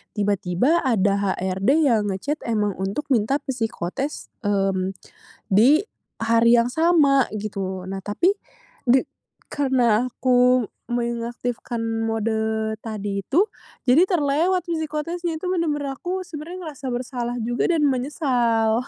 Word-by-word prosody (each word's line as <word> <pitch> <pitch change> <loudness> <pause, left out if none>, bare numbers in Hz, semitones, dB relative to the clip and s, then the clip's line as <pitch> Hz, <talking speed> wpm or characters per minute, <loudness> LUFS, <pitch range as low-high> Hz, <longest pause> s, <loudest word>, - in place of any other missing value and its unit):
Tiba-tiba, 205 - +1
ada 200 -5 +1
HRD 190 +3 -1
yang 225 -7 +2
nge-chat 285 +11 -3
emang 210 -3 +1
untuk 195 +10 -2
minta 240 +2 +2
psikotes, 250 +2 -4 0.2
mmm, 195 -1 0 0.6
di 250 - +5 0.4
hari 230 +1 +5
yang 235 +1 0
sama, 300 -4 +4
gitu. 195 -3 -4
Nah, 195 +1 -4
tapi, 315 - +2 0.6
de 255 +2 +5 0.5
karena 250 -5 +2
aku 250 -1 +3 0.2
mengaktifkan 235 0 -3 0.3
mode 220 0 -1
tadi 205 -3 -4
itu, 335 - +3 0.4
jadi 305 +9 +5
terlewat 340 +2 +1
psikotesnya. 330 +1 -3
Itu 365 +2 -2
benar-benar 295 -6 -1
aku 370 +1 -3
sebenarnya 345 +2 -8
ngerasa 280 -3 -7
bersalah 245 -1 -3
juga 240 +2 0
dan 325 -3 +2
menyesal. 245 -4 +1
240 Hz, 115 wpm, -23 LUFS, 215-295 Hz, 0.6 s, di